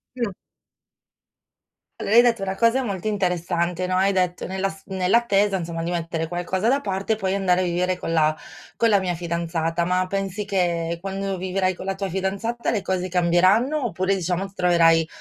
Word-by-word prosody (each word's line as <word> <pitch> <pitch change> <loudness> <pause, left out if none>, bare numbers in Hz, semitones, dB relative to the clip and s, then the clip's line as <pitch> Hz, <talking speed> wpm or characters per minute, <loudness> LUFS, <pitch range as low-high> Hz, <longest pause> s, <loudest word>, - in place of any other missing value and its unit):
Mh. 235 -5 -2 1.7
Allora 215 - 0
hai 240 - +10
detto 235 -3 +2
una 195 0 -2
cosa 230 +5 +2
molto 200 -4 -4
interessante 180 -3 -1
no, 185 - 0
hai 190 +2 +3
detto: 180 -2 0
"Nella 190 +1 -1
s 195 0 -9
nell'attesa, 200 +1 +2
insomma, 170 -2 -3
di 170 - -3
mettere 165 -1 -2
qualcosa 180 +4 -2
da 275 +3 +3
parte 195 +2 -1
e - - 0
poi 195 -3 -2
andare 185 -2 +2
a - - +1
vivere 180 +1 0
con 165 - -4
la 155 -1 +3 0.4
con 230 - +2
la 205 -2 +4
mia 180 -2 -2
fidanzata." 170 0 -2
Ma 180 +1 +1
pensi 195 +1 -3
che 170 -4 -1
quando 195 0 -3
vivrai 185 +1 0
con 185 - -9
la 195 0 -2
tua 195 0 -3
fidanzata 195 +6 -2
le 215 -4 0
cose 185 -1 -2
cambieranno 185 - +2
oppure, 190 -2 0
diciamo, 180 0 -1
ti 195 - -12
troverai 165 -2 +4
185 Hz, 185 wpm, -23 LUFS, 175-195 Hz, 1.7 s, hai